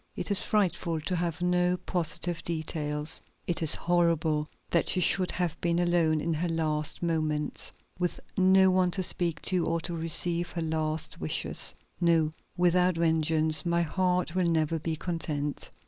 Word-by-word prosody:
"It - - -4
is 200 - +5
frightful 180 -5 0
to 180 +4 -2
have 170 0 -2
no 180 0 +2
positive 175 -1 -2
details. 155 -2 -1 0.2
It 175 - -1
is 160 - +5
horrible 165 -3 +1 0.2
that 170 - +2
she - - +2
should 180 +1 +3
have 175 -3 -2
been 170 0 +1
alone 175 -3 +2
in 165 +2 -1
her 170 +3 -1
last 155 -1 -2
moments, 155 -3 0 0.3
with 180 -1 -1 0.2
no 190 0 +5
one 185 -1 +3
to 190 - 0
speak 170 -3 -1
to, 180 -2 +1
or 165 +1 0
to 170 - -4
receive 170 +1 0
her 170 - -3
last 155 -1 -2
wishes. 80 - -2 0.2
No; 165 -3 +2 0.2
without 180 0 +3
vengeance, 160 -1 +1
my 170 -1 +1
heart 180 +1 0
will 185 -1 +1
never 160 0 +1
be 160 +1 -2
content." 155 -4 -3
170 Hz, 160 wpm, -28 LUFS, 155-180 Hz, 0.3 s, is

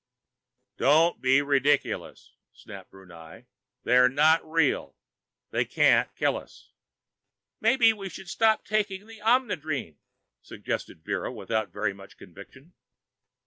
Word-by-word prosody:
"Don't 160 +5 +3
be 135 +2 +3
ridiculous!" 145 0 -1 0.2
snapped - - -13
Brunei. 85 -4 -15 0.4
"They're 125 +1 +4
not 155 +5 +3
real. 160 +1 -1 0.6
They - - +1
can't - - +2
kill - - 0
us!" - - -14 0.9
"Maybe 230 -4 +4
we 195 -3 -8
should 190 +2 -11
stop 220 +4 +1
taking 205 -2 -2
the 225 -1 -14
Omnidrene?" 160 - -1 0.4
suggested 80 - -6
Vera, - - -3
without 110 -3 -3
very 100 +2 -3
much 95 0 -15
conviction. 130 - -15
145 Hz, 110 wpm, -26 LUFS, -, 0.9 s, They're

